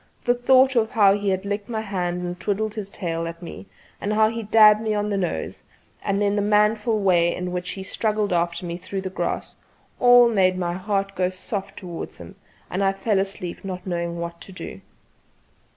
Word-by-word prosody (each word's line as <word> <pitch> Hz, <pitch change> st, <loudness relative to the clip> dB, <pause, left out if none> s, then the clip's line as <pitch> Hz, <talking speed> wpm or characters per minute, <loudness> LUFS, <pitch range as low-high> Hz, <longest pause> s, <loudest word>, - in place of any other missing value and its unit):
The 245 Hz, -, +4 dB
thought 260 Hz, +2 st, +4 dB
of 220 Hz, -2 st, +2 dB
how 200 Hz, -3 st, +5 dB
he 205 Hz, 0 st, -1 dB
had 190 Hz, +1 st, -1 dB
licked 205 Hz, +1 st, -3 dB
my 220 Hz, -2 st, -2 dB
hand 180 Hz, -4 st, -2 dB
and 175 Hz, 0 st, -5 dB
twiddled 210 Hz, +2 st, -1 dB
his 210 Hz, -3 st, -5 dB
tail 165 Hz, -3 st, -3 dB
at 165 Hz, 0 st, -7 dB
me, 175 Hz, +3 st, -9 dB, 0.3 s
and 205 Hz, -, -1 dB
how 215 Hz, 0 st, +4 dB
he 230 Hz, +1 st, -4 dB
dabbed 215 Hz, 0 st, +6 dB
me 215 Hz, -1 st, -1 dB
on 210 Hz, 0 st, -1 dB
the -, -, 0 dB
nose, 185 Hz, -3 st, -3 dB, 0.4 s
and 200 Hz, -1 st, 0 dB
then 205 Hz, 0 st, +1 dB
the 205 Hz, -, +1 dB
manful 210 Hz, +2 st, +2 dB
way 175 Hz, -3 st, +3 dB
in 180 Hz, 0 st, -4 dB
which 180 Hz, 0 st, -3 dB
he 190 Hz, -, -6 dB
had -, -, -8 dB
struggled 210 Hz, -3 st, 0 dB
after 170 Hz, +1 st, 0 dB
me 170 Hz, 0 st, -4 dB
through 190 Hz, +2 st, -5 dB
the 190 Hz, -1 st, -5 dB
grass, -, -, -3 dB, 0.4 s
all 245 Hz, -1 st, +7 dB
made 190 Hz, -5 st, +2 dB
my 175 Hz, -1 st, -1 dB
heart 195 Hz, +1 st, -2 dB
go 180 Hz, -1 st, 0 dB
soft 190 Hz, +2 st, -5 dB
towards 175 Hz, -3 st, -7 dB
him, -, -, -11 dB, 0.3 s
and 190 Hz, +2 st, -2 dB
I 195 Hz, 0 st, +3 dB
fell 200 Hz, 0 st, 0 dB
asleep 195 Hz, -2 st, -4 dB
not 185 Hz, -2 st, -6 dB
knowing 170 Hz, -2 st, -3 dB
what 170 Hz, 0 st, -6 dB
to -, -, -8 dB
do. 185 Hz, -, -8 dB
195 Hz, 210 wpm, -23 LUFS, 180-215 Hz, 0.4 s, all